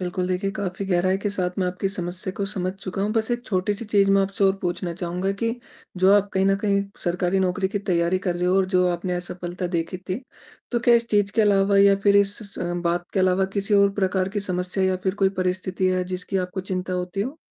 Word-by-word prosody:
बिल्कुल 180 0 -2
देखिए, 185 +2 -1
काफ़ी 195 -1 -4
गहराई 185 0 +2
के 205 - -2
साथ 185 -3 -1
मैं 185 - +1
आपकी 180 +2 -2
समस्या 185 0 -5
को 200 - -1
समझ 185 -2 -2
चुका 195 0 -5
हूँ। 210 +1 0
बस 225 +1 0
एक 240 0 -1
छोटी-सी 205 +3 -1
चीज़ 200 -2 +3
मैं 195 0 +5
आपसे 195 +1 -3
और 190 - +5
पूछना 175 -1 -2
चाहूँगा 180 +2 -2
कि 230 +1 +1 0.4
जो 190 +2 +5
आप 205 0 +3
कहीं 190 0 +2
न 195 0 +3
कहीं 200 -1 +2 0.2
सरकारी 180 +2 +1
नौकरी 190 +1 0
की 205 0 -2
तैयारी 180 -2 +1
कर 175 - +1
रहे 175 - -1
हो 185 +1 +3
और 190 -1 +3
जो 180 - +4
आपने 175 +1 -2
असफ़लता 180 0 -5
देखी 165 +3 -2
थी 190 +8 -3 0.5
तो 240 - +1
क्या 240 0 +5
इस 235 0 +2
चीज़ 205 -1 +2
के 220 - +4
अलावा 200 -1 +3
या 200 0 +6
फ़िर 200 0 +5
इस 200 0 +3 0.2
स - - -9 0.3
बात 175 +1 0
के 195 - +1
अलावा 185 +1 +3
किसी 200 +1 0
और 200 0 +5
प्रकार 190 -1 0
की 205 +1 -3
समस्या 185 0 -1
या 185 0 +2
फ़िर 190 +1 -2
कोई 195 -1 +3
परिस्थिति 185 +1 -1
है 185 0 +1
जिसकी 185 +1 -4
आपको 185 +1 -2
चिंता 185 0 -4
होती 180 +2 -3
हो? 260 +8 -3
190 Hz, 235 wpm, -24 LUFS, 180-200 Hz, 0.5 s, या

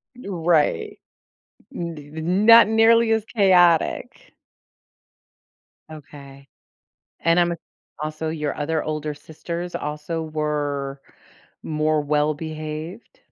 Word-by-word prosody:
Y 250 - -11
right. 165 - 0 0.7
D 160 -4 -7
not 210 +7 +6
nearly 225 +1 +4
as 220 -2 +1
chaotic. 180 -6 +2 1.6
Okay, 140 -2 -13 0.7
and 165 +1 +3
I'm 175 0 +2
a 170 - -4 0.5
also, 155 +1 -4
your 150 -2 -3
other 155 +1 -1
older 155 -1 -3
sisters 170 +4 -7
also 150 +2 -4
were 145 -3 -3 0.6
more 155 0 0
well-behaved? 155 - -3
155 Hz, 90 wpm, -22 LUFS, 150-175 Hz, 1.6 s, not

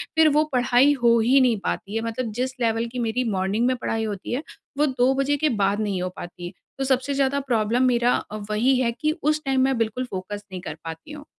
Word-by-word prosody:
फिर 320 -1 +6
वो 305 - +5
पढ़ाई 250 +3 +4
हो 235 -1 +5
ही 250 +5 +4
नहीं 245 -4 +3
पाती 200 +2 -3
है 225 - 0
मतलब 230 0 -3
जिस 255 0 -2
लेवल 230 0 +1
की 250 - -3
मेरी 235 +2 0
मॉर्निंग 195 +4 0
में 255 - +2
पढ़ाई 225 -2 -2
होती 205 +1 -5
है, 275 +6 -2 0.3
वो 295 - +3
2 260 -2 +2
बजे 285 +1 +1
के 305 +1 +1
बाद 200 +2 +1
नहीं 200 -3 -1
हो 185 - -2
पाती। 175 +1 -8 0.3
तो - - 0
सबसे 265 +1 0
ज़्यादा 275 0 +1
प्रॉब्लम 240 -2 +1
मेरा 245 0 +3
अ, 215 - -5
वही 245 +5 +2
है 240 -2 +1
कि 305 +6 -1
उस 305 +1 +1
टाइम 265 -1 +2
मैं 265 -1 +2
बिल्कुल 230 +3 -1
फ़ोकस 205 +2 -5
नहीं 185 -1 -6
कर 155 - -6
पाती 165 - -8
हूँ। 295 -1 -9
245 Hz, 230 wpm, -24 LUFS, 215-265 Hz, 0.3 s, फिर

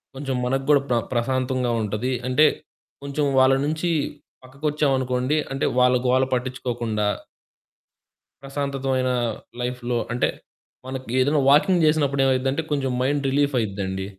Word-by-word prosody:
కొంచెం 135 -1 -3
మనకు 135 +2 0
గూడా 145 -2 +5
ప్ర 120 - +2 0.2
ప్రశాంతంగా 130 0 0
ఉంటది. 105 +4 -2 0.2
అంటే 130 +5 +4 0.6
కొంచెం 140 +1 -1
వాళ్ళ 130 +1 +5
నుంచి 155 +3 -1 0.5
పక్కకొచ్చామనుకోండి 135 -1 0
అంటే 135 +1 -1
వాళ్ళ 125 0 +5
గోల 130 +1 +3
పట్టిచ్చుకోకుండా... 120 -4 -2 1.4
ప్రశాంతతమైన 135 -2 -2 0.5
లైఫ్‌లో 125 0 -2 0.2
అంటే 125 - +1 0.6
మనకి 130 -2 -6
ఏదైనా 145 +3 +3
వాకింగ్ 165 +4 +4
జేసినప్పుడు 145 -3 +2
ఏమైద్దంటే 135 +3 +1
కొంచెం 135 -3 0
మైండ్ 145 +2 0
రిలీఫ్ 145 +1 +1
అయిద్దండి. 95 -3 -3
130 Hz, 115 wpm, -23 LUFS, 125-140 Hz, 1.4 s, గూడా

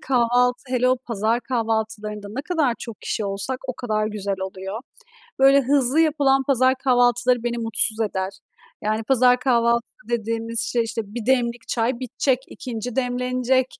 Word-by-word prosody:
kahvaltı, 250 -1 +2
hele 250 0 +2
o 255 - +3
pazar 230 -2 -1
kahvaltılarında 220 -4 -2
ne 255 +6 -4
kadar 305 -7 +1
çok 230 -3 -8
kişi 215 - -3
olsak 200 +6 -2
o - - 0
kadar 215 -3 -1
güzel 200 -2 -3
oluyor. 190 +3 -5 0.6
Böyle 275 +1 +6
hızlı 275 +2 +2
yapılan 285 -4 +3
pazar 260 -1 +3
kahvaltıları 245 -1 +3
beni 240 0 -1
mutsuz 225 -1 0
eder. 190 -3 -1 0.5
Yani, 215 +1 0
pazar 250 0 +4
kahvaltısı 235 -3 0
dediğimiz 230 0 -2
şey 240 - +2
işte, 225 0 -3
1 235 -2 -5
demlik 240 -2 +1
çay 235 +1 0
bitecek, 255 +1 0
2'nci 245 -1 -6
demlenecek. 250 0 +1
240 Hz, 150 wpm, -23 LUFS, 225-255 Hz, 0.6 s, Böyle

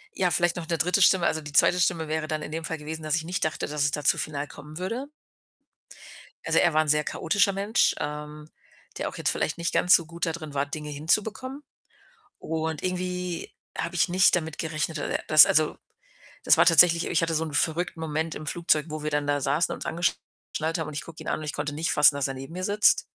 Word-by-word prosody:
ja, 180 - +1
vielleicht 175 0 +1
noch 165 -2 -6
'ne 165 -2 -1
3. 180 +5 +2
Stimme. 180 -1 +5
Also, 160 - 0
die 145 -1 -10
2. 175 +4 +4
Stimme 165 -2 0
wäre 155 0 -2
dann 155 -1 -3
in 150 - -8
dem 165 0 -4
Fall 160 -1 -3
gewesen, 160 +1 -7
dass 155 +1 0
ich 160 - -3
nicht 180 +2 -2
dachte, 155 - -3
dass 150 -1 -3
es 145 - +2
da 150 0 -4
zu - - +3
final 145 -1 -4
kommen 150 +3 -11
würde. 235 +10 -4 1.4
Also, - - +2
er - - +3
war 155 - +3
'n 155 - -5
sehr 150 0 +2
chaotischer 200 +4 +1
Mensch, 200 +4 +1
ähm, 150 +1 -6 0.5
der - - -3
auch - - -10
jetzt - - 0
vielleicht 155 - -2
nicht 170 0 -2
ganz 180 - +5
so 170 - +3
gut 170 +1 -4
da 165 - -1
drin 155 -3 -8
war, 140 +1 0
Dinge 150 +1 -6
hinzubekommen 220 - -1 0.8
und 160 -1 -4
irgendwie 180 -1 -4 0.3
habe 170 +1 -4
ich 175 - +2
nicht 185 +1 +4
damit 160 -2 -4
gerechnet, 160 0 -3
dass 145 - -4
er - - -2
dass 155 -1 +9
also, 155 0 +2 0.7
das - - +6
war - - +5
tatsächlich 170 0 +6
ich 165 - 0
hatte 165 0 0
so 160 - 0
'n 155 -2 -7
verrückten 170 +3 0
Moment 160 0 -3
im 155 - -8
Flugzeug, 155 -2 +1
wo 155 0 -6
wir 150 - -2
dann 145 -1 -1
da 145 0 0
saßen, 145 +6 0
uns - - -8
angeschnallt 165 -1 -3
haben 160 -2 -4
und 150 - -8
ich 145 - -4
gucke 165 -1 -11
ihn - - -9
an - - -1
und - - -7
ich 150 - -4
konnte 145 0 -3
nicht 160 +1 -1
fassen, 150 -1 +6
dass 140 -1 -1
er 135 - -5
neben 135 +4 -9
mir 185 +1 -5
sitzt. 205 +2 +3
160 Hz, 240 wpm, -25 LUFS, 150-175 Hz, 1.4 s, dass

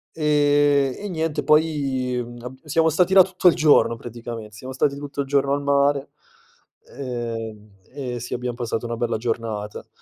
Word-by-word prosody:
E 145 -3 +3
e 205 - -5
niente 160 -4 -2
poi 140 -4 +1 0.3
abb 125 +2 -8
siamo 160 +2 +2
stati 180 +4 +2
là 190 -1 +9
tutto 185 0 0
il 175 - +7
giorno 155 -7 +4
praticame 115 -2 -8
siamo 130 +5 -9
stati 140 +2 +1
tutto 145 0 -4
il 140 - -5
giorno 140 0 +2
al 145 - 0
mare, 140 0 +2 0.9
ehm, 115 -5 -5 0.2
e 125 -4 -5
sì, 120 - -6
abbiam 125 -1 -3
passato 120 -1 -3
una 115 0 -4
bella 120 -1 -1
giornata. 110 -2 -4
135 Hz, 160 wpm, -23 LUFS, 120-145 Hz, 0.9 s, là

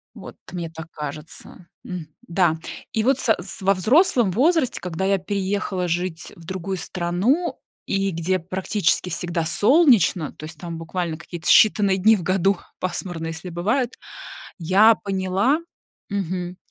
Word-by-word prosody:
Вот - - -10 0.2
мне 170 -2 -4
так 160 0 -9
кажется. 150 +3 -9 0.2
М, 180 -4 -6 0.2
да, 170 -2 +2 0.4
и 220 - +1
вот 270 +2 +2
са 225 -4 +3
с 180 +1 -5
во 195 +1 +4
взрослом 240 - +3
возрасте, 290 - +2
когда 180 +1 -3
я 195 0 +3
переехала 190 -1 -2
жить 175 0 -3
в 170 - -15
другую 190 +1 -4
страну, 190 - -1 0.3
и 195 0 0
где 175 +2 -1
практически 185 +1 0
всегда 170 -1 -2
солнечно, 210 - +4
то 155 - -10
есть 160 0 -9
там 170 -2 -6
буквально 170 0 -3
какие-то 160 +1 -8
считанные 205 -3 +5
дни 215 +4 +5
в 175 - -6
году 195 +1 +2 0.2
пасмурно, 175 -2 -3
если 165 +3 -6
бывает, 220 +9 -1 0.7
я 195 +6 +5
поняла, 195 - 0 0.5
мгм, 180 -2 -3
185 Hz, 145 wpm, -22 LUFS, 170-205 Hz, 0.7 s, считанные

